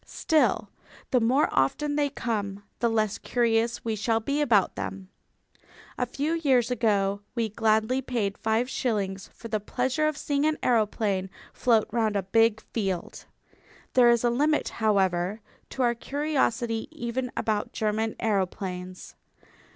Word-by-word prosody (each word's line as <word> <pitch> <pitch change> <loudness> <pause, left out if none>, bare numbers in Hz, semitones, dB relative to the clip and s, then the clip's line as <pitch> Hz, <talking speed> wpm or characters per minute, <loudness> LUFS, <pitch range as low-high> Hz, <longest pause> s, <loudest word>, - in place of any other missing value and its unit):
Still, 315 -1 +1 0.4
the 250 - +4
more 255 +6 +3
often 290 - +1
they 290 -1 +1
come 205 -7 -3 0.2
the 235 - +2
less 215 -2 0
curious 235 -1 0
we 225 -1 0
shall 225 +2 +1
be 280 +6 -1
about 225 -9 +3
them. 95 -1 -6 0.9
A 250 - -1
few 285 +6 -2
years 265 -7 +2
ago 205 -4 +1
we 230 -2 0
gladly 220 +4 +1
paid 225 -6 -2
five 225 +3 0
shillings 200 -7 -2
for 230 - -10
the 215 -1 -1
pleasure 260 +8 0
of 305 -2 -2
seeing 285 +1 0
an 310 - 0
aeroplane 210 -5 +1 0.2
float 230 -3 +2
round 220 -2 +1
a 200 - 0
big 225 +3 +3
field. 195 -6 -4 0.7
There 245 -2 +6
is 235 0 +3
a 240 - +3
limit, 295 +5 +1
however, 195 -2 +1 0.3
to 265 - -2
our 240 -1 +3
curiosity 245 -4 -1
even 245 +1 -4
about 215 -2 -1
German 220 +1 -1
aeroplanes. 185 -3 -3
225 Hz, 145 wpm, -27 LUFS, 205-250 Hz, 0.9 s, There